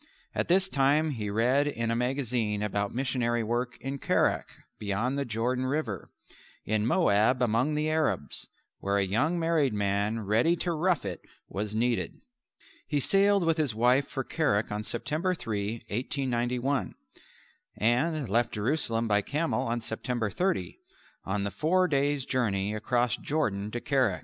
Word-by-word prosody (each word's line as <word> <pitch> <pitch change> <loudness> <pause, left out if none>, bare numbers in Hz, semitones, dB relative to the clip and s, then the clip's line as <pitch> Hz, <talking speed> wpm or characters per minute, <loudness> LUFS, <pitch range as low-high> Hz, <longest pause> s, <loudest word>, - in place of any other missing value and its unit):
At - - -1
this 190 +2 +4
time 150 0 +2
he 110 -6 -3
read 125 +7 +2
in 115 -5 -1
a - - +1
magazine 120 -4 -1
about 100 -1 -1
missionary 120 -2 0
work 120 +2 -2
in 135 +1 -4
Kerak - - +1 0.3
beyond 105 +6 -1
the 140 0 -1
River - - -16
Jordan 125 - -1 0.6
in 110 +1 +1
Moab 125 - +3
among 125 +5 +1
the 150 +1 0
Arabs 155 - 0 0.3
where 100 +1 0
a 100 - +2
young 140 - +1
married 165 -6 +2
man 105 +2 0
ready 115 - +3
to 175 +1 -1
rough 170 - +1
it 90 -3 -4 0.3
was 105 +1 -3
needed. 120 +1 0 0.7
He 145 - 0
sailed 195 +4 +3
with 165 0 +2
his 145 -8 0
wife 125 +4 +3
for 135 - -3
Kerak 110 -10 0
on 105 +1 -2
September 160 - -1
3, 110 -4 -3
1891, 125 +2 -1 0.8
and 135 +5 +1
left 115 +4 +1
Jerusalem 115 0 0
by 105 -1 +3
camel 145 +1 -1
on 120 0 -1
September 110 -1 -2
30, 170 - -1 0.5
on 100 +1 -1
the 100 - -2
four 175 - +2
days' 140 -2 +1
journey 105 -6 0
across 120 +2 0
Jordan 105 -10 -1
to 120 - -3
Kerak. 130 -8 +1
125 Hz, 150 wpm, -28 LUFS, 105-145 Hz, 0.8 s, this